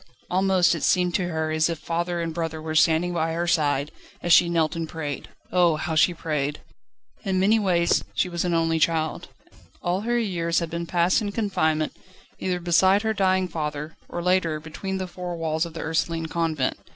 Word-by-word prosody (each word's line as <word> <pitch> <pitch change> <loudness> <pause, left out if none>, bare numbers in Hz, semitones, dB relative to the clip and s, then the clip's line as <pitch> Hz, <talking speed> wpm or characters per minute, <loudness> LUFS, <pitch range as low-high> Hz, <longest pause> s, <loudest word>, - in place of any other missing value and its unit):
Almost 185 -1 +3
it 165 - -3
seemed 180 -2 +2
to 180 -1 0
her 160 -2 -2
as 155 +1 +2
if 165 - -2
father 170 +2 -2
and 165 -1 -3
brother 165 -1 -3
were 155 0 -5
standing 165 +2 +3
by 165 -1 0
her 170 +1 -1
side, 150 -4 +1 0.3
as 175 - +4
she 170 - +6
knelt 165 -1 +1
and 165 -1 -4
prayed. 150 -4 -5 0.2
Oh! 175 -3 +4
how 160 +2 -3
she 160 +3 +4
prayed! 150 -3 -2 0.6
In 190 -1 0
many 210 +4 +4
ways 175 -4 +2
she - - +1
was 170 -1 -2
only 165 -2 +1
a - - -1
child. 160 -1 0 0.5
All 180 +2 -1
her 240 +2 0
years 170 -7 -1
had 170 -2 -1
been 170 0 -4
passed 175 +5 +2
in 205 -1 -2
confinement, 160 -8 0 0.4
either 180 -1 -1
beside 185 +4 +3
her 220 0 +1
dying 190 -2 +2
father 150 -2 -4
or, 175 - -4
later, 180 -4 +1
between 190 +5 -5
the 190 - -3
four 180 -1 -6
walls 160 0 -1
of 165 - -13
the 160 - -4
Ursuline 165 0 -1
Convent. 160 -4 -1
170 Hz, 195 wpm, -24 LUFS, 160-180 Hz, 0.6 s, she